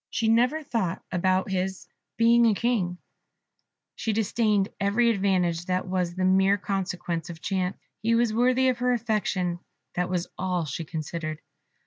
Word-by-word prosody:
She 225 Hz, -, 0 dB
never 250 Hz, +7 st, +3 dB
thought 225 Hz, -, -2 dB
about 185 Hz, +2 st, +1 dB
his 190 Hz, 0 st, -2 dB, 0.3 s
being 235 Hz, +1 st, +5 dB
a 215 Hz, -, +3 dB
King; 200 Hz, -7 st, 0 dB, 1.0 s
she 220 Hz, -, -2 dB
disdained 210 Hz, -1 st, +1 dB
every 220 Hz, +4 st, +3 dB
advantage 180 Hz, -5 st, +1 dB
that 185 Hz, 0 st, -1 dB
was 180 Hz, -2 st, -1 dB
the 185 Hz, 0 st, 0 dB
mere 190 Hz, +2 st, +4 dB
consequence 180 Hz, -4 st, -3 dB
of 165 Hz, -1 st, -8 dB
chance. 185 Hz, +1 st, -2 dB, 0.2 s
He 230 Hz, +1 st, +2 dB
was 230 Hz, -1 st, +2 dB
worthy 255 Hz, +3 st, +3 dB
of 250 Hz, -2 st, -1 dB
her 250 Hz, 0 st, +2 dB
affection 210 Hz, -6 st, -1 dB, 0.3 s
that 180 Hz, 0 st, -1 dB
was 180 Hz, -1 st, -1 dB
all 180 Hz, -3 st, -1 dB
she 155 Hz, +3 st, -4 dB
considered. 155 Hz, 0 st, -4 dB
190 Hz, 150 wpm, -26 LUFS, 180-230 Hz, 1.0 s, being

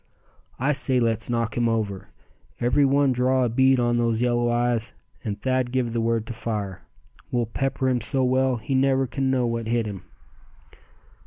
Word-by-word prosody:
"I 140 Hz, +4 st, +1 dB
say 130 Hz, -2 st, +1 dB
let's 115 Hz, -1 st, 0 dB
knock 115 Hz, -1 st, -1 dB
him 120 Hz, -1 st, +1 dB
over. 105 Hz, -4 st, -2 dB, 0.5 s
Every 125 Hz, +4 st, +3 dB
one 140 Hz, 0 st, +3 dB
draw 130 Hz, +1 st, +2 dB
a -, -, 0 dB
bead 130 Hz, +2 st, +3 dB
on 120 Hz, 0 st, +1 dB
those 115 Hz, -1 st, +1 dB
yellow 120 Hz, 0 st, +1 dB
eyes, 120 Hz, -1 st, 0 dB, 0.3 s
and 105 Hz, -3 st, -4 dB
Thad 130 Hz, -1 st, 0 dB
give 125 Hz, -3 st, -1 dB
the 115 Hz, -, 0 dB
word 115 Hz, -1 st, 0 dB
to 120 Hz, -, -6 dB
fire. 105 Hz, -4 st, -4 dB, 0.5 s
We'll 120 Hz, -1 st, 0 dB
pepper 135 Hz, +3 st, -2 dB
him 125 Hz, -2 st, +1 dB
so 130 Hz, +5 st, -1 dB
well 130 Hz, 0 st, +2 dB
he 110 Hz, +3 st, -4 dB
never 135 Hz, 0 st, +3 dB
can 135 Hz, +1 st, -2 dB
know 130 Hz, -2 st, +1 dB
what 115 Hz, -1 st, -2 dB
hit 115 Hz, 0 st, +1 dB
him." 100 Hz, -4 st, -6 dB
120 Hz, 180 wpm, -24 LUFS, 115-130 Hz, 0.5 s, Every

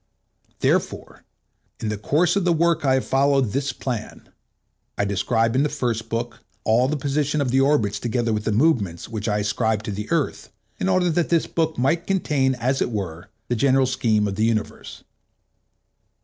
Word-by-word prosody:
Therefore, -, -, -1 dB, 0.5 s
in 110 Hz, -, -3 dB
the 105 Hz, -, -2 dB
course 155 Hz, -, +2 dB
of 200 Hz, -, +1 dB
the 175 Hz, -, +2 dB
work 165 Hz, -1 st, +2 dB
I 135 Hz, -2 st, +3 dB
have 130 Hz, -, -1 dB
followed 135 Hz, -3 st, +2 dB
this 140 Hz, +2 st, -1 dB
plan: 120 Hz, -3 st, -6 dB, 0.7 s
I 100 Hz, -, +1 dB
describe 115 Hz, +4 st, 0 dB
in 130 Hz, -, +3 dB
the 150 Hz, -, +1 dB
first 120 Hz, -6 st, -2 dB
book 115 Hz, +1 st, -3 dB, 0.2 s
all 120 Hz, +4 st, +3 dB
the 155 Hz, +2 st, -1 dB
positions 145 Hz, +2 st, -1 dB
of 130 Hz, -3 st, 0 dB
the 135 Hz, +1 st, +3 dB
orbits 115 Hz, -8 st, +2 dB
together 120 Hz, 0 st, -1 dB
with 105 Hz, 0 st, -2 dB
the -, -, +1 dB
movements 105 Hz, -, +1 dB
which 110 Hz, -1 st, -5 dB
I 105 Hz, -, +1 dB
ascribe 105 Hz, +1 st, 0 dB
to 105 Hz, -, -4 dB
the 105 Hz, +2 st, -5 dB
Earth, 165 Hz, -4 st, -1 dB, 0.3 s
in 190 Hz, -, 0 dB
order 185 Hz, -2 st, +2 dB
that 170 Hz, +1 st, 0 dB
this 170 Hz, -2 st, +2 dB
book 160 Hz, -1 st, -1 dB
might 160 Hz, +7 st, +1 dB
contain, 145 Hz, -9 st, +1 dB
as 130 Hz, +3 st, -1 dB
it -, -, +1 dB
were, 95 Hz, -4 st, -5 dB, 0.2 s
the 120 Hz, -, 0 dB
general 135 Hz, +3 st, +3 dB
scheme 110 Hz, -5 st, +1 dB
of 100 Hz, 0 st, -4 dB
the 110 Hz, -, +2 dB
universe. 110 Hz, -2 st, -3 dB
125 Hz, 185 wpm, -23 LUFS, 110-145 Hz, 0.7 s, I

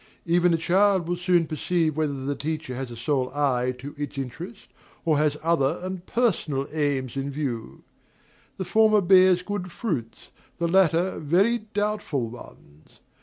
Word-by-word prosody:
Even 175 Hz, +1 st, +3 dB
a 165 Hz, -, +3 dB
child 190 Hz, +1 st, +2 dB
will 175 Hz, -, 0 dB
soon 175 Hz, -1 st, +2 dB
perceive 160 Hz, 0 st, 0 dB
whether 145 Hz, -4 st, -2 dB
the 145 Hz, -, 0 dB
teacher 155 Hz, -1 st, -4 dB
has 130 Hz, 0 st, -5 dB
a 120 Hz, -, -8 dB
sole 130 Hz, +1 st, -1 dB
eye 130 Hz, -4 st, +1 dB
to 140 Hz, +3 st, -8 dB
its 145 Hz, -1 st, -5 dB
interest, 170 Hz, -, -7 dB, 0.4 s
or 155 Hz, -3 st, +3 dB
has 150 Hz, -1 st, +1 dB
other 160 Hz, -5 st, +1 dB
and 185 Hz, -1 st, -6 dB
personal 165 Hz, -, 0 dB
aims 140 Hz, -5 st, -1 dB
in 135 Hz, +1 st, -2 dB
view. 135 Hz, -6 st, -5 dB, 0.7 s
The 190 Hz, -, -3 dB
former 215 Hz, +2 st, +4 dB
bears 185 Hz, -1 st, +5 dB
good 185 Hz, -2 st, -4 dB
fruits, 135 Hz, -, -4 dB, 0.3 s
the 170 Hz, -, 0 dB
latter 180 Hz, 0 st, +2 dB
very 200 Hz, +9 st, +2 dB
doubtful 205 Hz, -, -1 dB
ones. 80 Hz, -10 st, -15 dB
160 Hz, 155 wpm, -25 LUFS, 140-185 Hz, 0.7 s, bears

